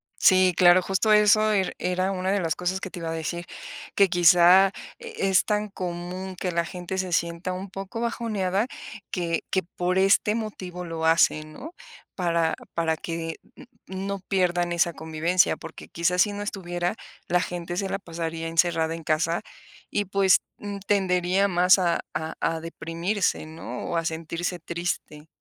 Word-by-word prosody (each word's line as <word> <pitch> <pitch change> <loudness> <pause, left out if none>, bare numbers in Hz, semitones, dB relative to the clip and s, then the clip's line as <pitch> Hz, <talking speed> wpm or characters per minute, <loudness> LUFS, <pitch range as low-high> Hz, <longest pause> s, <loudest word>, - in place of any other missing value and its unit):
Sí, 185 -1 +5
claro, 180 0 +7
justo 195 +4 +2
eso 210 +1 +5
er 195 -3 0
era 185 +1 0
una 190 0 -1
de 200 - +2
las 165 -4 -1
cosas 180 +1 -2
que 190 - -5
te 180 - -8
iba 165 -1 -4
a - - -2
decir 165 +2 -4 0.5
que 200 -1 +5
quizá 180 +2 +6 0.3
e 465 - -3
es 190 - +4
tan 210 0 0
común 185 0 -5
que 180 0 -3
la 170 0 0
gente 180 +2 -6
se 185 -1 -2
sienta 170 +2 -1
un 190 +2 -6
poco 195 +4 -6
bajoneada 215 -4 -1 0.5
que 170 -3 -1
que 190 - +2
por 180 +1 -2
este 195 +2 +4
motivo 185 -5 -5
lo 165 -1 -3
hacen, 155 -1 +3
¿no?, 315 - -9 0.4
para 170 -3 +1 0.2
para 160 -1 0
que 165 0 -4 0.2
n - - -14 0.2
no 195 +1 -4
pierdan 180 -2 0
esa 170 0 +2
convivencia, 160 +3 +1
porque 165 - -10
quizás 180 +2 +2
si 205 - -3
no 205 - -5
estuviera, 175 -3 -3 0.3
la 180 - +3
gente 175 -1 -4
se 195 - -1
la 195 - -3
pasaría 165 -2 -5
encerrada 165 -1 +1
en 165 - -9
casa 160 +2 +1 0.5
y 205 - 0
pues, 195 -1 +4 0.2
n 205 -1 -6
tendería 190 -1 +2
más 180 0 +5
a 175 -3 +1 0.2
a 160 +1 -3
a 165 - 0
deprimirse, 165 +4 -2
¿no?, 155 -6 -7
o 170 - 0
a 165 - -1
sentirse 165 +2 -3
triste. 170 -2 -4
180 Hz, 170 wpm, -25 LUFS, 165-190 Hz, 0.5 s, claro